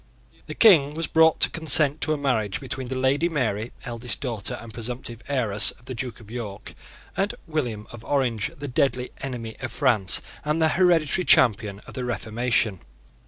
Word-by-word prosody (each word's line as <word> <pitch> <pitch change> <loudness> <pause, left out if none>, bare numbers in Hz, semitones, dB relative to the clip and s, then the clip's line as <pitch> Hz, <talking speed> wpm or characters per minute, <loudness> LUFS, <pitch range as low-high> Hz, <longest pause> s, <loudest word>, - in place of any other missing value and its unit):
The - - -7
King 155 -10 +5
was 165 +1 -2
brought 160 0 +4
to - - +4
consent 155 -2 +4
to 155 - 0
a 155 - +1
marriage 115 -8 -1
between 130 -1 -6
the 130 +1 -4
Lady 140 +6 +1
Mary, 120 -7 -2
eldest 120 -1 -3
daughter 115 -7 -3
and 115 -1 -11
presumptive 120 0 -6
heiress 110 -7 +3
of 120 - -12
the 130 - -6
Duke 125 0 -6
of 110 -1 -14
York 105 -4 -7 0.4
and 200 +1 -1
William 125 - -3
of 120 -1 -11
Orange, 120 -5 0
the 145 0 -6
deadly 130 -2 0
enemy 120 -4 -6
of 130 -2 -5
France 115 -9 +1 0.2
and 150 +2 -1
the 160 -1 +3
hereditary 175 -1 +2
champion 105 -4 +4
of - - -13
the 130 - -4
Reformation. 115 -4 -1
125 Hz, 175 wpm, -24 LUFS, 115-145 Hz, 0.4 s, King